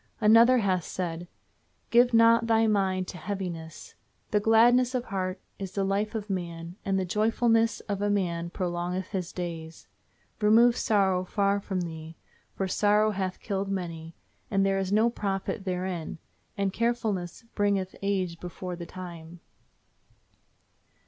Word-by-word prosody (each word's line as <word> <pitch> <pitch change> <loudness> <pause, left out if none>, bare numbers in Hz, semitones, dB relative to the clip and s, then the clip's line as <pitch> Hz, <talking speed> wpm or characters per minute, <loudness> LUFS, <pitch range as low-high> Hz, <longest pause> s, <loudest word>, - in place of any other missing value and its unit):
Another 230 +3 +6
hath 190 -6 +1
said, 175 -1 -4 0.6
"Give 240 +1 +5
not 230 0 +5
thy 225 0 +4
mind 190 -3 +1
to 180 - -8
heaviness. 170 -4 -6 0.4
The 210 - +3
gladness 240 +4 +4
of 250 -1 -1
heart 185 -1 -3 0.2
is 190 -2 -6
the 195 - 0
life 200 +3 -1
of 210 -2 -3
man, 170 -3 -5
and 195 -1 0
the 190 - 0
joyfulness 225 +3 +2
of 200 -1 -4
a 205 - +1
man 170 -4 -1
prolongeth 180 +1 -3
his 185 -4 -3
days. 165 -2 -6 0.5
Remove 230 +3 +5
sorrow 190 -6 +2
far 200 +1 +1
from 195 -2 -3
thee, 160 -1 -7 0.4
for 195 - -1
sorrow 210 +3 +3
hath 190 -2 -3
killed 195 -1 -2
many, 165 -4 -5 0.3
and 195 -1 +2
there 195 0 +1
is 190 0 -2
no 220 +3 +3
profit 195 -1 -3
therein; 180 -3 -3 0.4
and 195 -1 0
carefulness 220 -7 -1
bringeth 200 -2 0
age 185 -4 -1
before 180 +1 -6
the 170 -1 -8
time." 175 -2 -9
195 Hz, 140 wpm, -27 LUFS, 180-215 Hz, 0.6 s, Another